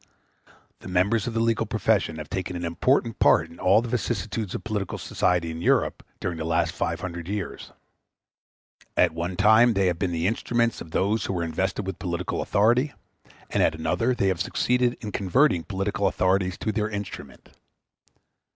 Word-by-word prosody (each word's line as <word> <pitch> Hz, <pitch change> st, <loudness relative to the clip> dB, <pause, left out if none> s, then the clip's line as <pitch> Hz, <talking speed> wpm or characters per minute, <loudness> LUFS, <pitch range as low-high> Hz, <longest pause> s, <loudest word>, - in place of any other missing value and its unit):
The -, -, -11 dB
members 95 Hz, +5 st, +1 dB
of 115 Hz, -, -4 dB
the -, -, +1 dB
legal 115 Hz, -1 st, +1 dB
profession 80 Hz, -, +1 dB
have 75 Hz, -2 st, -7 dB
taken 90 Hz, +4 st, -4 dB
an 85 Hz, 0 st, -3 dB
important 115 Hz, +7 st, +1 dB
part 80 Hz, 0 st, +4 dB
in 85 Hz, -, -14 dB
all 100 Hz, +5 st, +4 dB
the -, -, -4 dB
vicissitudes 110 Hz, -3 st, -2 dB
of -, -, -5 dB
political 105 Hz, -6 st, -3 dB
society 85 Hz, -2 st, 0 dB
in 80 Hz, +1 st, -6 dB
Europe -, -, +2 dB, 0.2 s
during 85 Hz, -2 st, -3 dB
the -, -, -2 dB
last 80 Hz, 0 st, +1 dB
five -, -, -2 dB
hundred 85 Hz, -2 st, -5 dB
years. 100 Hz, -1 st, -5 dB, 1.3 s
At -, -, +4 dB
one 85 Hz, +3 st, -4 dB
time 110 Hz, +5 st, +5 dB
they 95 Hz, 0 st, +2 dB
have 90 Hz, -2 st, 0 dB
been 95 Hz, -, 0 dB
the 85 Hz, 0 st, -1 dB
instruments 115 Hz, +2 st, 0 dB
of 85 Hz, -, -8 dB
those 100 Hz, +5 st, 0 dB
who -, -, -2 dB
were 85 Hz, -2 st, -1 dB
invested 95 Hz, +5 st, -2 dB
with 95 Hz, -2 st, -5 dB
political 90 Hz, -1 st, -3 dB
authority, 120 Hz, +8 st, +2 dB, 0.6 s
and -, -, +1 dB
at -, -, +3 dB
another 80 Hz, +11 st, 0 dB
they 100 Hz, -4 st, +1 dB
have 90 Hz, -2 st, -1 dB
succeeded 125 Hz, +4 st, +1 dB
in 105 Hz, -3 st, -5 dB
converting 100 Hz, -, +2 dB
political 100 Hz, +3 st, -1 dB
authorities 95 Hz, 0 st, +1 dB
into 110 Hz, -, -2 dB
their 105 Hz, 0 st, -1 dB
instrument. 100 Hz, -1 st, -7 dB
95 Hz, 180 wpm, -25 LUFS, 85-110 Hz, 1.3 s, time